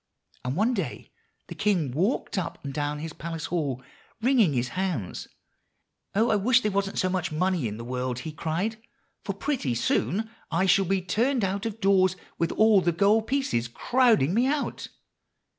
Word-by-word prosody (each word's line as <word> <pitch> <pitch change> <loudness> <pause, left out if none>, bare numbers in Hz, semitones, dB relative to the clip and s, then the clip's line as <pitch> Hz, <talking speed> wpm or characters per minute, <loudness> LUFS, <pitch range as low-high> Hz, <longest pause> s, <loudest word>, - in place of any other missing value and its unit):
And 125 +2 -2
one 220 +7 +2
day 180 - -4 0.3
the - - -8
king 180 -10 +1
walked 185 - 0
up 180 -4 -3
and 140 - -4
down 145 0 -2
his 160 +1 -6
palace 165 -1 -5
hall, 140 -7 -2 0.4
wringing 230 - +3
his 125 -1 0
hands. 180 - -3 0.9
'Oh! 225 +4 +3
I - - +3
wish 240 +5 +4
there 210 - 0
wasn't 195 0 -1
so 185 - +2
much 185 -2 -1
money 175 -3 0
in 105 0 -5
the 115 - -7
world,' 125 0 -2
he 160 - -5
cried; 175 +9 -2 0.4
'for 200 - -3
pretty 200 - -1
soon 205 - 0 0.2
I 170 +3 +1
shall 195 +1 +4
be 190 0 0
turned 235 +6 +1
out 195 +3 -1
of 225 0 -6
doors, 190 -2 +3 0.2
with 170 0 +1
all 215 -3 +5
the 175 - +2
gold 205 +6 +3
pieces 265 - 0
crowding 225 - +2
me 240 +5 +3
out. 290 +1 -2
185 Hz, 175 wpm, -26 LUFS, 155-215 Hz, 0.9 s, all